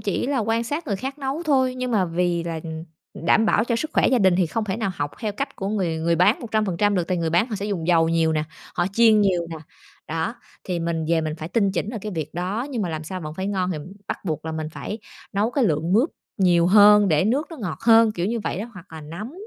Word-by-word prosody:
chỉ 205 +2 -1
là 280 0 0
quan 225 +1 0
sát 295 +6 -3
người 200 - -1
khác 270 +7 -5
nấu 275 +4 -3
thôi, 260 -5 +2
nhưng 255 0 -3
mà 205 -5 +2
vì 175 0 0
là, 165 -2 -4
ừm, 160 0 -6 0.4
đảm 220 - +4
bảo 215 - +3
cho 235 -1 0
sức 310 +6 -3
khỏe - - +3
gia 255 - +3
đình 190 -3 +4
thì 185 - +2
không 220 +7 -2
thể 195 -1 -2
nào 220 -4 -1
học 145 -3 -3
theo 215 -3 -2
cách 275 +8 -4
của 195 - -3
người 180 -6 -1
người 165 +1 +1
bán 200 - +4
100% 210 -4 0
được 180 -3 +1
tại 185 - 0
người 165 -1 -1
bán 175 +7 +3
họ 215 - -3
sẽ 200 +1 -4
dùng 175 -6 -3
dầu 165 -2 +4
nhiều 165 -1 +2
nè, 155 -1 0 0.3
họ 175 0 +1
chiên 220 -1 +5
nhiều 180 -4 +2
nè, 165 - -5 0.5
đó. 165 +7 -2 0.3
Thì 180 -2 -2
mình 165 -1 -1
về 165 -1 +3
mình 155 -1 -3
phải 155 +1 -6
tinh 200 -2 +1
chỉnh 195 +3 -2
ở 230 - -4
cái 210 -2 -4
việc 155 -3 -5
đó, 195 +9 -2
nhưng 240 -6 -2
mà 180 - -2
làm 155 -1 -4
sao 185 +3 -5
vẫn 155 -2 -6
phải 190 +3 -3
ngon 190 -2 -1
thì 155 - -4 0.3
bắt - - -5
buộc 155 -4 -3
là 160 - -4
mình 155 -1 -3
phải 210 +7 -6 0.3
nấu 205 +4 +1
cái 270 0 +1
lượng 165 -1 0
mướp 245 +10 +3 0.3
nhiều 175 -3 +4
hơn 210 +1 +7
để 155 +1 +3
nước 270 +9 +1
nó 325 - -8
ngọt 195 -9 -5
hơn, 225 -1 +5
kiểu 175 -1 -2
như 230 +2 -1
vậy 195 - -3
đó, 235 - -6
hoặc 185 +1 -11
là 160 - -7
nấm, 170 - -7
195 Hz, 275 wpm, -23 LUFS, 165-225 Hz, 0.5 s, hơn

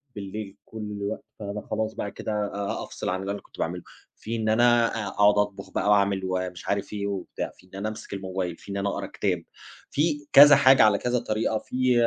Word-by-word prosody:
بالليل 100 0 -6
كل 110 - -11
الوقت، 100 -1 -4 0.2
فأنا 105 0 -5
خلاص 110 0 -1
بقى 100 - -4
كده - - -5 0.2
أ 100 0 -3
أفصل - - -5
عن 95 +1 -1
اللي 95 +1 -3
أنا 100 - -5
كنت - - -19
باعمله. - - -2 0.3
في 115 +2 -5
إن 110 -1 -1
أنا 120 +1 +5 0.2
أ - - -4
أقعُد 105 +1 +4
أطبُخ 105 -1 -1
بقى - - 0
وأعمل 100 -1 +3
ومش 90 -1 -3
عارِف 100 0 -1
إيه 100 -1 -2
وبتاع، 100 -2 -4
في - - -21
إن 95 - -14
أنا 105 +2 -2
أمسك 110 -1 -8
الموبايل، 95 -3 -3
في - - -11
إن 100 - -3
أنا 100 0 0
أقرَأ - - -3
كتاب، - - -1 0.5
في 145 -1 0
كذا 145 +1 +10
حاجة 135 -1 +6
على 105 -2 +5
كذا 125 +3 0
طريقة، 110 -1 -1
في 130 +3 0
105 Hz, 215 wpm, -26 LUFS, 100-110 Hz, 0.5 s, كذا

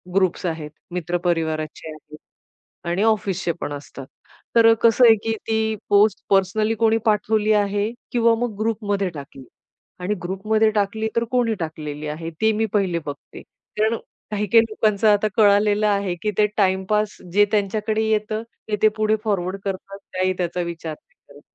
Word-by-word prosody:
Groups 185 -2 +1
आहेत, 160 -3 -3 0.2
मित्र 175 0 -2
परिवाराचे 160 -2 -2
आहेत 155 0 -13 0.7
आणि 175 +4 0
ऑफिसचे 200 -5 +1
पण - - -4
असतात. 140 -2 -9 0.5
तर 230 -1 +7
अ, - - +6
कसं 230 +2 +5
आहे 225 - +8
की 225 - 0 0.2
ती 220 0 +1
पोस्ट 205 0 +4
पर्सनली 200 +3 +2
कोणी 225 0 +2
पाठवली 215 0 +2
आहे 205 0 +1 0.2
किंवा 235 -1 +4
मग 235 -3 -3
ग्रुपमध्ये 205 -3 -1
टाकली. 140 -3 -10 0.6
आणि 185 +4 -1
ग्रुपमध्ये 215 +4 +1
टाकली 215 +1 -1
तर 230 - +2
कोणी 245 -3 +1
टाकलेली 155 -2 -5
आहे? 165 +2 -5
ते 220 - +4
मी 220 +1 0
पहिले 190 -5 +1
बघते. 145 0 -8 0.4
कारण 220 +2 +2 0.3
काही-काही 210 +2 +3
लोकांचं 215 -1 +1
आता 210 0 +3
कळालेलं 210 0 +4
आहे, 200 -3 0
की 215 - 0
ते 210 - +5
टाईमपास 200 +2 +1 0.2
जे 205 +2 +5
त्यांच्याकडे 215 +1 0
येतं 215 0 0 0.3
ते 210 - 0
ते 215 - +7
पुढे 215 0 +2
फॉरवर्ड 195 -3 -1
करतात 195 0 -5 0.2
काही 185 0 +1
त्याचा 175 0 -2
विचार 170 -2 -4
नाही - - -30
करत. 145 0 -15
205 Hz, 160 wpm, -22 LUFS, 175-220 Hz, 0.7 s, आहे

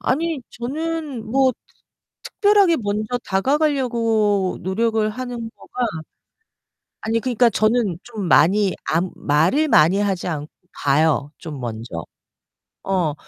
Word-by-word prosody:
아니, 315 +1 -1
저는 290 -1 -4
뭐 265 0 +3 0.7
특별하게 405 -5 +3
먼저 215 +3 -2
다가가려고 230 -5 +1
노력을 220 +3 0
하는 240 -1 -6
거가 250 - -10 1.2
아니 225 +1 0
그러니까 240 0 +2
저는 215 -5 +1
좀 215 -6 -5
많이 190 +6 +4
안 170 +3 0
말을 170 - +2
많이 185 - +5
하지 195 -4 -1
않고 150 -3 -4 0.3
봐요 145 0 +2
좀, 150 -5 -8
먼저. 110 -8 -6 0.8
어 180 -6 0
215 Hz, 220 characters per minute, -21 LUFS, 175-255 Hz, 1.2 s, 많이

